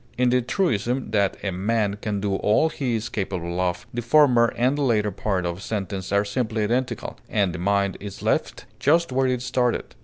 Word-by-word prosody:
In 125 0 +3
the 125 0 +3
truism 125 - -1
that 100 -3 +1
"a 100 - -1
man 100 +2 0
can 105 -3 -2
do 100 -1 -1
all 110 +12 +3
he 130 -6 -2
is 110 +1 -2
capable 90 -3 -3
of," 90 -1 -1
the 120 - -2
former 120 -2 +4
and 125 +4 +2
the 145 - -2
latter 110 -6 +2
part 95 -1 -2
of 85 0 -2
the - - -11
sentence 95 -3 -4
are 100 +1 +2
simply 110 0 -1
identical, 125 +4 -2
and 100 -4 +1
the 90 - -5
mind 100 +1 +1
is 100 -1 -8
left - - -1
just 165 +2 +3
where 130 +1 +2
it 125 -1 -1
started. 125 -1 0
105 Hz, 205 wpm, -24 LUFS, 100-125 Hz, -, former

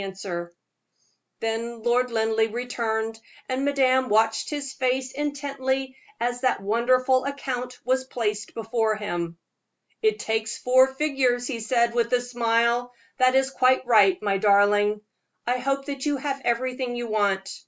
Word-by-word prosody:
Then 225 0 -3
Lord 245 +1 +2
Linleigh 225 -1 +1
returned, 225 -2 -2 0.3
and 260 +1 -2
madame 260 -2 +2
watched 220 +1 +2
his 285 -2 -4
face 255 0 -1
intently 270 -2 -3 0.2
as 245 +1 -2
that 255 - +1
wonderful 255 +5 +2
account 255 -3 -4
was 260 +1 +1
placed 210 -5 -3
before 225 -1 0
him. 175 -5 -4 0.6
"It 435 -1 +2
takes 220 - -2
four 255 +1 +5
figures," 265 -3 0
he 245 -2 -3
said, 235 +1 +1
with 235 0 0
a 250 - +5
smile; 240 0 +1 0.3
"that 255 0 +4
is 265 0 +2
quite 260 -1 +3
right, 205 -6 +5
my 200 -2 +1
darling. 205 +1 +3 0.4
I 250 +1 0
hope 275 +2 -1
that 280 -2 -5
you 290 -1 +1
have 275 0 -3
everything 250 +1 -1
you 240 0 -3
want. 200 -3 -1
245 Hz, 140 wpm, -25 LUFS, 225-260 Hz, 0.6 s, four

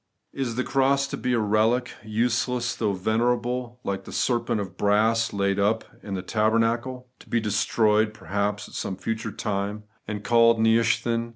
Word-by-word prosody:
Is 130 -4 -3
the 130 - 0
cross 135 +1 +2
to - - -3
be 125 - -1
a 120 - +2
relic, 110 +4 +1
useless 120 +2 0
though 105 -3 0
venerable, 120 +4 -1
like 95 -1 -3
the - - -9
serpent 120 -3 0
of 95 -4 -5
brass 110 +3 +2
laid 100 0 0
up 105 +3 +2 0.2
in 100 -2 -5
the 90 - -4
tabernacle; 115 +4 0
to - - -17
be 120 - +2
destroyed 110 0 +2
perhaps 100 +1 -3
at - - -16
some 95 - -4
future 110 +2 -3
time, 100 +1 -3 0.2
and 105 -1 -5
eaUed 115 0 +5
Nehushtan? 115 +1 +2
110 Hz, 165 wpm, -25 LUFS, 105-120 Hz, 0.2 s, eaUed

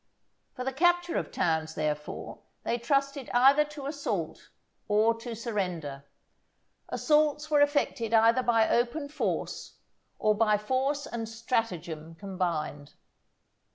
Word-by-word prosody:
For 255 - -4
the 265 +1 -2
capture 350 +3 +2
of - - -2
towns, 160 -1 0
therefore, 150 -1 -3 0.2
they 235 - -1
trusted 275 +2 0
either 270 +4 +6
to 295 -2 -9
assault 285 0 -4 0.4
or 215 +2 +4
to 230 0 -6
surrender. 180 - -3 0.8
Assaults 300 0 +2
were 295 -1 +5
effected 285 -6 +1
either 230 +2 +5
by 230 -3 +3
open 250 +5 0
force, 300 - -3 0.4
or 215 0 +3
by 210 0 +3
force 265 +6 -1
and 225 -1 -5
stratagem 180 -9 -3
combined. 165 -6 -3
230 Hz, 120 wpm, -29 LUFS, 185-280 Hz, 0.8 s, either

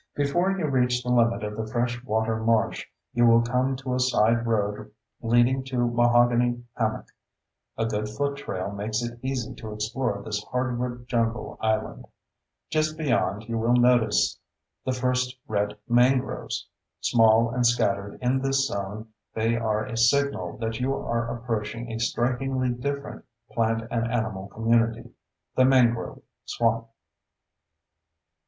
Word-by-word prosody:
Before 145 +6 +1
you 195 -4 -1
reach 125 -3 +1
the 125 - -4
limit 115 -2 +3
of 105 0 -4
the 110 0 -4
fresh 120 0 -1
water 110 -1 0
marsh 110 0 +1 0.3
you 120 0 +4
will 115 0 +6
come 125 +2 0
to 130 -1 -4
a 125 - 0
side 120 -2 +2
road 105 -2 -1 0.3
leading 120 +3 +3
to 125 -2 0
Mahogany 120 0 +3
Hammock. 110 -2 -2 0.7
(A 115 - 0
good 105 -1 -2
foot 140 +5 -2
trail 95 -8 -4
makes 110 +3 -2
it 120 0 -6
easy 130 -3 -3
to 110 -2 -8
explore 105 +1 -2
this 105 -1 -3
hardwood 125 -1 -3
jungle 115 -1 -1
island.) 110 -1 -1 0.6
Just 155 0 0
beyond, 120 -9 0
you 115 -1 -2
will 115 +2 +3
notice 120 -3 +3 0.5
the 130 - 0
first 125 0 0
red 105 -1 -1
mangroves. 125 +2 +1 0.3
Small 115 0 +4
and 125 0 0
scattered 100 -4 +1
in 125 +2 +2
this 135 0 +2
zone, 105 0 -5 0.3
they 115 +1 +1
are 110 -2 0
a 125 -3 -6
signal 140 +5 +1
that 115 0 -3
you 135 +2 0
are 115 -3 -2
approaching 115 0 -4
a 115 - -4
strikingly 130 +2 0
different 140 +4 -4 0.3
plant 115 0 0
and 115 0 0
animal 110 -5 -2
community, 115 +1 0 0.4
the 130 - +5
mangrove 125 -3 +2 0.2
swamp. 115 0 0
120 Hz, 140 wpm, -26 LUFS, 110-125 Hz, 0.7 s, will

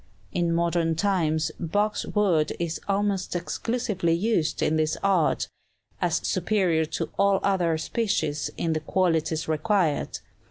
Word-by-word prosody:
In 175 -1 0
modern 170 -1 +1
times 160 -4 +1
box 205 +5 0
wood 180 -8 +2
is 170 -1 -3
almost 200 -2 0
exclusively 190 -1 -1
used 175 -2 0
in 155 - +2
this 155 0 +1
art, 190 -5 +2 0.5
as - - +1
superior 180 -7 +1
to 160 0 -4
all 200 -1 +4
other 175 -5 +2
species 160 -4 -1
in 165 -1 0
the 155 - 0
qualities 165 -1 0
required. 160 0 +1
170 Hz, 125 wpm, -26 LUFS, 160-200 Hz, 0.5 s, all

